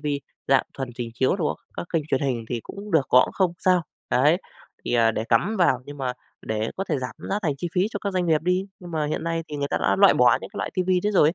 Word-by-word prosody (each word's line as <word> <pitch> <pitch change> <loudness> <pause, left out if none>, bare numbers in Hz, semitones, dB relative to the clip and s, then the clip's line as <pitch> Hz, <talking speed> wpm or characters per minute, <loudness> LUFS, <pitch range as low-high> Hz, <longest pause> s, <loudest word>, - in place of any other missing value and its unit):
TV 150 - -6 0.4
dạng 135 -1 +5
thuần 135 -2 -4
trình 120 -2 -5
chiếu 130 +8 +2
đồ 165 -6 0
á, - - -1 0.2
các - - -4
kênh 165 -3 +2
truyền 135 - +2
hình 125 -5 -1
thì 120 -2 -2
cũng 205 +1 -9
được, 150 -5 +3
có 125 - +7
cũng - - -8
không 185 -3 +1
sao, 185 -2 +3 0.3
đấy, 150 +6 +4 0.5
thì, - - -1
à, 115 -1 +4
để 110 0 -3
cắm 150 - +2
vào, 170 -8 +4
nhưng 145 +1 -9
mà 130 -2 -1 0.3
để 110 +1 -1
có 195 - -2
thể - - 0
giảm 125 -1 -5 0.2
giá 200 - +1
thành 155 -6 +1
chi 175 - -3
phí 185 +3 +3
cho 205 - -4
các 200 - -2
doanh 180 -1 0
nghiệp 155 -2 +2
đi. 180 +3 +1
Nhưng 175 - -9
mà 155 -2 -1
hiện 155 +2 -3
nay 165 0 -1
thì 150 - -5
người 140 0 -2
ta - - -1
đã - - +2
loại 200 -1 +7
bỏ 125 +1 +5
những - - -8
cái - - -7
loại - - -2
TV 185 -1 -1 0.2
đấy 210 - +1
rồi 155 -6 +5
ấy, 165 - -1
155 Hz, 295 wpm, -24 LUFS, 130-180 Hz, 0.5 s, có